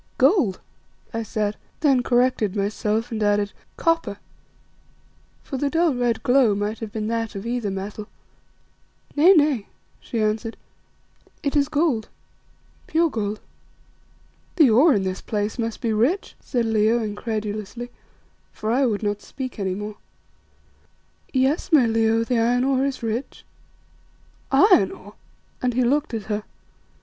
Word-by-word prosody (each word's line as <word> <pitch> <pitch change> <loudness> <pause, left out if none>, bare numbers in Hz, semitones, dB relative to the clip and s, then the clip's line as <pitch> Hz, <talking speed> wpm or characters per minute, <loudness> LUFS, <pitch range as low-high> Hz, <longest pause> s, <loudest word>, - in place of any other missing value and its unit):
"Gold," 235 - +3 0.5
I 225 - -1
said, 210 -1 -2 0.2
then 275 -5 +4
corrected 245 -5 +1
myself 215 +3 -1
and 220 -1 -3
added, 205 -1 +1 0.2
"Copper," 330 - 0 1.3
for 270 - -5
the 280 +2 0
dull, 330 0 +2
red 240 -3 0
glow 245 -5 +4
might 205 +2 -2
have 225 -2 -6
been 215 -1 -3
that 225 -2 -2
of 195 +2 -6
either 235 -3 -2
metal. 200 +2 -5 1.1
"Nay, 330 +6 +7
nay," 290 - +2 0.3
she 230 - -4
answered, 220 +1 -1 0.9
"it 280 0 -1
is 285 0 +2
gold, 290 -8 0 0.8
pure 330 0 +2
gold." 210 -2 -3 1.1
"The 305 -9 +6
ore 270 +6 +6
in 200 - +1
this 185 0 -3
place 210 +2 -3
must 230 -1 -3
be 225 -2 0
rich," 265 - +1
said 240 -3 -1
Leo, 220 +1 +3
incredulously, 215 +2 -4 0.6
for 215 +1 -3
I 260 +2 +3
would 215 -2 -2
not 205 0 -1
speak 255 -4 -7
any 190 -2 -1
more. 210 +1 -6 1.3
"Yes, 270 +7 +1
my 290 -6 +6
Leo, 225 0 +2
the 235 0 0
iron 245 +2 +2
ore 270 0 +2
is 270 -3 -5
rich." 230 +4 -4 1.1
"Iron 270 - +5
ore?" 205 +2 -13 0.5
and 250 -2 0
he 255 - +3
looked 285 +1 +1
at 220 - -4
her. 210 +1 -2
230 Hz, 140 wpm, -23 LUFS, 210-265 Hz, 1.3 s, Nay